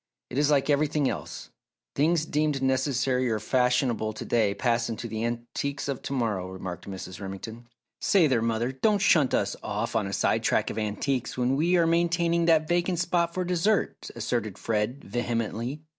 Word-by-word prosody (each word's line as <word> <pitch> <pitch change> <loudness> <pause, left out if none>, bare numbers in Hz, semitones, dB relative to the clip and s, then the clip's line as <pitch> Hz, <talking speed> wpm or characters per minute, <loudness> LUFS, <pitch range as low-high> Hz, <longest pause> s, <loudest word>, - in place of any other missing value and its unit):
"It 130 - -1
is 145 0 +3
like 140 -2 +3
everything 150 -1 +2
else - - -7 0.4
things 160 +2 +2
deemed 150 -3 0
necessary 130 -1 +1
or 110 - +1
fashionable 125 -2 +1
to - - -7
day 110 -4 +2
pass 120 -1 0
into 115 +1 -4
the 110 0 -4
antiques 120 +5 -3
of 140 -2 -3
to - - -6
morrow," 105 -8 -1
remarked 95 0 -7
Mrs. 95 0 -7
Remington. 110 +5 -7 0.3
"Say 190 -5 +4
there, 130 -6 +2
mother! 115 +2 0
don't 205 +11 +2
shunt 155 -8 +4
us - - 0
off - - -3
on 105 -3 +1
a - - -5
sidetrack - - +1
of 110 - -4
antiques 120 +5 -2
when 125 +1 +1
we 170 +5 +3
are 170 - +4
maintaining 170 0 +2
that 160 -2 +4
vacant 175 +1 +1
spot 170 -1 0
for 185 - 0
dessert," 180 +3 0
asserted - - -2
Fred, 110 +4 -2
vehemently. 120 +4 -3
130 Hz, 175 wpm, -27 LUFS, 115-155 Hz, 0.4 s, Say